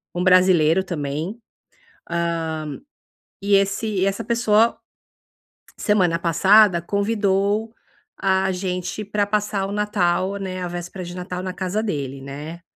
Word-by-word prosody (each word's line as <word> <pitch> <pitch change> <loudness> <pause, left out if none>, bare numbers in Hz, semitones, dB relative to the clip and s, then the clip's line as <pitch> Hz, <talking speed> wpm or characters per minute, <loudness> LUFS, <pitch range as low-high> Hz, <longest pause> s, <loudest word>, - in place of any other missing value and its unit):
Um 175 - -1
brasileiro 180 -2 +5
também, 160 +5 -4 0.7
hã, 165 -3 -2 0.7
e 200 0 +2
esse 200 +3 0
e 200 -3 0
essa 195 +3 -1
pessoa, 230 -1 +2 1.0
semana 185 -6 +2
passada, 180 +2 +5
convidou 200 +2 0 0.5
a 190 0 +2
gente 180 +2 -3
pra 205 0 0
passar 205 -1 -1
o - - -6
Natal, 195 -2 0
né 185 -2 -5
a 180 - -2
véspera 175 +1 -6
de 175 +1 -8
Natal 180 0 -5
na 185 -1 -4
casa 190 +3 -2
dele, 140 -9 -3
né. 150 +5 -8
185 Hz, 125 wpm, -22 LUFS, 170-205 Hz, 1.0 s, brasileiro